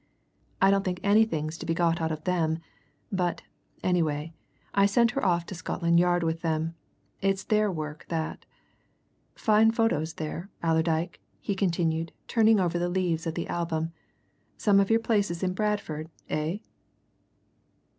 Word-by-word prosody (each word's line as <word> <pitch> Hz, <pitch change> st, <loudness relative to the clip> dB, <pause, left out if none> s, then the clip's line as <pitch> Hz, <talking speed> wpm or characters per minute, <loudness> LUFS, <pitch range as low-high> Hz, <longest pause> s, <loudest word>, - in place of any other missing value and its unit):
I 195 Hz, +1 st, +5 dB
don't 195 Hz, 0 st, +2 dB
think 180 Hz, -2 st, -2 dB
anything's 185 Hz, -7 st, +2 dB
to -, -, -6 dB
be 165 Hz, -, +1 dB
got 170 Hz, -1 st, +2 dB
out 160 Hz, 0 st, 0 dB
of 155 Hz, 0 st, -4 dB
them, 165 Hz, -3 st, +1 dB, 0.5 s
but, 180 Hz, -3 st, -1 dB, 0.4 s
anyway, 165 Hz, -3 st, 0 dB, 0.4 s
I 200 Hz, 0 st, +5 dB
sent 230 Hz, +3 st, +3 dB
her 275 Hz, -, -2 dB
off 175 Hz, -2 st, +2 dB
to -, -, -7 dB
Scotland 170 Hz, -1 st, +1 dB
Yard 175 Hz, 0 st, +3 dB
with 165 Hz, 0 st, -1 dB
them 160 Hz, 0 st, -1 dB, 0.5 s
it's 195 Hz, 0 st, +1 dB
their 215 Hz, -1 st, +2 dB
work 155 Hz, -3 st, -6 dB
that. 160 Hz, -2 st, -3 dB, 0.9 s
Fine 220 Hz, +1 st, +4 dB
photos 195 Hz, -9 st, +1 dB
there, 165 Hz, +4 st, -5 dB
Allerdyke," 160 Hz, +1 st, +1 dB, 0.2 s
he 200 Hz, -, -2 dB
continued, 165 Hz, -4 st, 0 dB
turning 225 Hz, -2 st, +4 dB
over 175 Hz, -2 st, +1 dB
the 175 Hz, 0 st, 0 dB
leaves 175 Hz, -3 st, 0 dB
of 165 Hz, -, -2 dB
the 170 Hz, -, -3 dB
album. 165 Hz, -1 st, -2 dB, 0.6 s
"Some 200 Hz, -2 st, +4 dB
of 195 Hz, -, +2 dB
your 225 Hz, 0 st, +4 dB
places 205 Hz, -6 st, 0 dB
in 185 Hz, -1 st, +1 dB
Bradford, 190 Hz, -7 st, -2 dB, 0.2 s
eh." 155 Hz, +5 st, -1 dB
175 Hz, 150 wpm, -27 LUFS, 160-200 Hz, 0.9 s, I